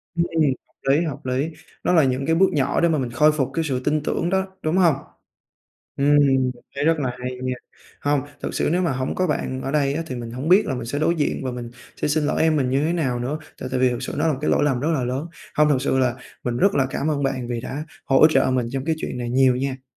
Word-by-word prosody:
Ừm, 170 0 +2 0.6
hợp 135 - +5
lý, 155 - +2
hợp 150 -5 -5
lý. 130 +5 0 0.3
Nó - - +2
là 160 -4 +5
những 130 +1 0
cái 165 - +3
bước 190 +3 +4
nhỏ 140 -3 +1
để 170 - +4
mà 155 -3 +1
mình 125 -3 -2
khôi 150 +5 +4
phục 140 -4 0
cái 165 - 0
sự 130 -5 -1
tin 150 0 +1
tưởng 170 +3 -1
đó, 190 0 +1 0.2
đúng 155 +3 0
hông? 175 -6 +5 1.0
Ừm, 145 +1 +4
mình 135 -3 +3 0.2
thấy 140 - -1
rất 165 -1 +3
là 130 -3 -1
hay 125 0 -3
nha! 130 0 -1 0.5
Hông, 145 -1 +1 0.2
thực - - -4
sự - - 0
nếu 180 +1 +2
mà 170 - +1
hổng 130 0 -2
có 185 - +1
bạn 130 -5 -2
ở 135 - -3
đây 140 -2 +1
á 165 +3 -2
thì 130 - -5
mình 120 -1 -6
hổng 130 +7 -4
biết 200 +3 +6
là 135 - -2
mình 125 -2 -5
sẽ 145 +5 -3
đối 170 +2 +2
diện 150 -3 -1
và 130 - -2
mình 120 -1 -6 0.2
sẽ - - -2
xin 150 +1 +1
lỗi 150 - +1
em 160 -1 +3
mình 130 -4 +1
như 135 +3 +1
thế 170 - +1
nào 130 -8 0
nữa, 135 +6 -2 0.2
tại 130 - -4
tại - - 0
vì 130 0 +4
thực 120 -1 -3
sự - - -4
nó 155 +2 +1
là 155 - +2
một 130 - -5
cái 150 - 0
lỗi - - +3
lầm 135 -4 +1
rất 150 +5 -1
là 135 -5 0
lớn. 130 +6 -2 0.3
Hông, 150 0 +4
thực 135 -3 +2
sự 130 - +1
là 125 -2 +2 0.3
mình 120 -1 -1
rất 200 +6 +3
là 135 - +3
cảm 140 +2 -2
ơn 140 -2 -1
bạn 130 -3 -1
vì 120 -1 -3
đã 140 +4 -5 0.2
hỗ 135 +3 +6
trợ 155 - +2
mình 125 -2 +1
trong 135 +1 -3
cái 160 -1 +1
chuyện - - -4
này 120 -1 -3
nhiều 130 0 +4
nha! 130 0 -3
140 Hz, 290 wpm, -22 LUFS, 130-155 Hz, 1.0 s, biết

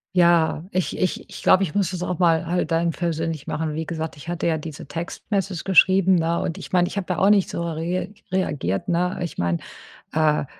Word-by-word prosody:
Ja, 170 -3 +4
ich 185 -2 -1
ich 185 - -1
ich - - -10
glaube, 190 - +5
ich 165 - -3
muss 200 -3 +1
das 180 -1 -4
auch 180 0 -3
mal 170 -1 +3
halt 175 +2 -1
dann 165 +1 +1
persönlich 165 -3 -3
machen. 155 -1 -2
Wie 160 0 -4
gesagt, 160 -1 -4
ich 145 +4 -10
hatte 175 - -2
ja 160 -2 +1
diese 155 -1 -8
Text-Message 185 +1 -3
geschrieben, 190 0 +5
ne? 165 +1 +1
Und 165 - -3
ich - - -9
meine, 175 -1 +3
ich - - -7
habe 185 -2 -1
ja - - -3
auch 195 +2 +5
nicht 200 -3 +3
so 170 - -3
re 170 +5 -3 0.2
reagiert, 145 - -1
ne, 180 +1 +1
ich 170 - -5
meine, 85 -1 +1 0.6
äh, 155 -2 +2
170 Hz, 215 wpm, -23 LUFS, 160-185 Hz, 0.6 s, glaube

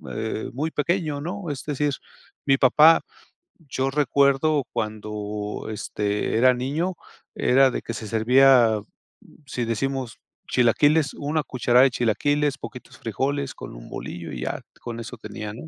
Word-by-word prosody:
eh, 110 0 -3
muy 150 +5 -2
pequeño, 155 -2 -1
¿no? 180 +1 -5
Es 140 -2 -4
decir 145 -1 -1 0.5
mi 135 -1 +4
papá, 150 +5 +6 0.7
yo 135 +1 -1
recuerdo, 140 +1 +2
cuando, 105 -1 -4
este, 105 0 -2
era 125 +2 +5
niño 155 +9 -2 0.4
era 135 +1 +4
de - - -3
que 115 - -5
se 110 0 -6
servía 120 0 +5 0.7
si 125 -2 -3
decimos 130 +1 -3 0.3
chilaquiles, 145 +5 +3
una 150 +2 -1
cucharada 125 -1 +3
de 135 - +4
chilaquiles, 140 +5 +1
poquitos 125 - -10
frijoles 135 +4 -2
con - - -9
un - - -11
bolillo, 85 -1 -7
y 60 - -6
ya, - - -3 0.2
con 115 -1 -6
eso 115 +1 -7
tenía, 105 -1 -7
¿no? 140 +9 -9
130 Hz, 140 wpm, -24 LUFS, 110-145 Hz, 0.7 s, papá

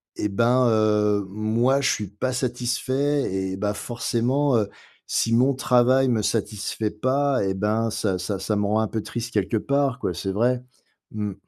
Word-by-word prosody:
et 105 - -2
ben, 120 +4 +3
heu, 105 -2 +2
moi 115 +6 +1
je 135 - +2
suis 105 - -2
pas 105 +7 -3
satisfait 130 +2 -1
et 95 0 -2
bah, 105 +1 -1
forcément, 125 +4 0
heu, 105 -2 0 0.4
si 115 - 0
mon 130 +4 +4
travail 130 +1 +3
me 115 -4 +1
satisfait 105 0 -2
pas 130 +3 +1
et 95 - 0
ben, 105 +3 0
ça 95 -4 -1
ça 95 +2 -3
ça 105 - -1
me 105 - 0
rend 105 +2 +1
un 110 - +1
peu 110 - -3
triste 120 0 -5
quelque 105 +1 0
part 140 +2 0
quoi, 90 - -2
c'est 95 +3 -3
vrai. 120 +5 +1 0.5
Mmh. 105 -2 -3
115 Hz, 180 wpm, -24 LUFS, 105-125 Hz, 0.5 s, mon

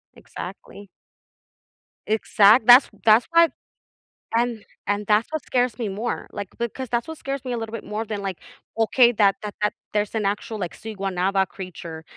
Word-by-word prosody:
exactly. 200 0 -10 1.2
Exact 215 +1 +4
That's 245 +3 +9
that's 220 +2 +5
why 335 0 +6 0.9
and 235 -2 0 0.2
and 205 +1 -1
that's 215 +1 +3
what 315 -3 -4
scares 250 -1 0
me 225 - -1
more, 215 +5 -4
like, 200 -2 -5
because 240 +2 -4
that's 235 +2 -1
what 320 -1 -7
scares 275 -1 -5
me 250 - -3
a - - -2
little 225 0 -6
bit 230 - -5
more 215 +2 -4
than, 210 -2 -4
like, 195 -3 -4 0.4
okay, 235 +2 +4
that 200 -3 +3
that 210 -1 -6
that 210 - +1 0.2
there's 210 +1 -1
an 215 -2 -1
actual, 210 +2 -2
like, 175 -5 -4
Siguanaba 195 -2 -1
creature, 170 -4 -9
215 Hz, 170 wpm, -23 LUFS, 200-235 Hz, 1.2 s, That's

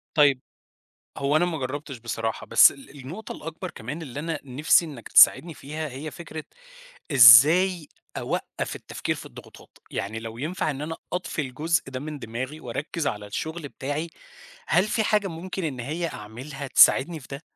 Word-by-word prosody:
طيب، 140 -4 +4 0.8
هو 140 +2 0
أنا 165 +3 +4
ما 170 -2 -3
جرّبتش 140 0 -5
بصراحة، 115 -1 -4
بس - - +7
ال 140 +1 -14
النقطة 165 +12 -8
الأكبر 165 +3 -7
كمان 140 +9 -7
اللي 140 -3 -7
أنا 165 +2 -3
نفسي 140 +5 +3
إنك 140 -8 -10
تساعدني 170 -1 +6
فيها، 155 +2 -6
هي 140 +4 -7
فكرة 160 -1 -8 0.7
إزاي 150 +8 +7 0.3
أوقّف - - -4
التفكير - - -4
في - - -9
الضغوطات، - - -15
يعني 105 +3 -4
لو 115 0 -8
ينفَع 155 +4 -2
إن 140 -1 -5
أنا 160 +2 -5 0.2
أطفي 180 -3 -2
الجزء 155 +6 -1
ده 130 -1 -5
من 150 +1 -6
دماغي 130 +5 -6
وأركِّز 140 +6 -4
على 105 0 -3
الشغل 160 +8 -5
بتاعي، 145 +5 -4 0.6
هل 185 - +4
في 215 +1 0
حاجة 210 -2 +1
ممكن 180 +2 -6
إن 135 -6 -3
هي 155 +7 -3
أعملها 130 +7 -8
تساعدني 150 +4 +5
في 135 - -15
ده؟ 140 +2 -7
150 Hz, 165 wpm, -25 LUFS, 130-165 Hz, 0.8 s, بس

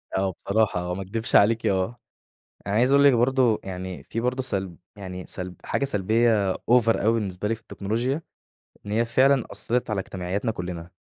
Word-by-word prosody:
آه، 95 0 +1
بصراحة 100 +1 0
آه، 90 0 -3
ما 95 - -4
اكدبش 110 +4 -3
عليكِ 115 +3 +4
آه، 95 +5 0 0.7
أنا 100 - -1
عايز 125 +5 +3
أقول 140 0 +6
لِك 140 - +7
برضه 125 -1 +3
يعني 95 -1 -6
في 115 - -4
برضه 125 +2 -1
سلب 95 -8 -3 0.2
يعني 90 -2 -7
سلب 90 -1 -6
حاجة - - -1
سلبية 110 -3 +2
Over 120 -1 +2
أوي 110 - +3
بالنسبة 105 -3 -2
لي 115 - +1
في 115 - -13
التكنولوجيا، 115 +8 -2 0.6
إن 100 - -4
هي 115 +2 +2
فعلًا 130 +2 +3
أثّرت 120 -1 -1
على 105 -2 0
اجتماعياتنا 95 +5 -3
كلنا. 90 -3 -6
110 Hz, 180 wpm, -25 LUFS, 95-120 Hz, 0.7 s, لِك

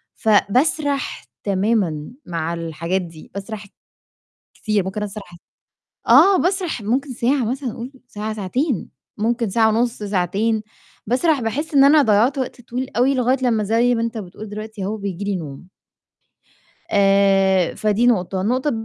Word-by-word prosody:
فباسرح 270 +7 +1 0.2
تمامًا 195 -6 0
مع 170 -1 -3
الحاجات 165 +2 -2
دي، 165 -3 -11
باسرح 200 +1 -7 0.9
كتير، 215 -3 0
ممكن 210 +2 -3
أسرح 195 -4 -8 0.7
آه 395 0 +7
باسرح 360 - -1
ممكن 255 +6 -1
ساعة 250 +2 +1
مثلًا 260 -2 -3
قُول 245 +4 -7 0.2
ساعة 215 0 -5
ساعتين، 220 - -2 0.3
ممكن 230 0 0
ساعة 220 +2 +3
ونُص 235 +2 +1
ساعتين، 205 +3 0 0.4
باسرح 270 +5 +2
باحسّ 285 +8 -3
إن 275 0 +7
أنا 295 +1 +6
ضيَّعت 230 +4 +3
وقت 255 -1 -4
طويل 250 +2 -5
أوي 260 +3 +3
لغاية 255 +1 +2
لمّا 225 -4 +2
زي 230 +4 +2
ما 230 - -1
أنت 230 -1 -3
بتقول 200 +2 -8
دلوقتي 215 -1 -6
أهو 210 +3 -2
بييجي 200 -1 -5
لي 200 -1 -1
نوم. 155 +1 -8 1.2
آآ 195 -2 +3
فدي 215 +3 +1
نقطة. 190 -5 +1
النقطة 255 +8 0
220 Hz, 140 wpm, -21 LUFS, 195-250 Hz, 1.2 s, آه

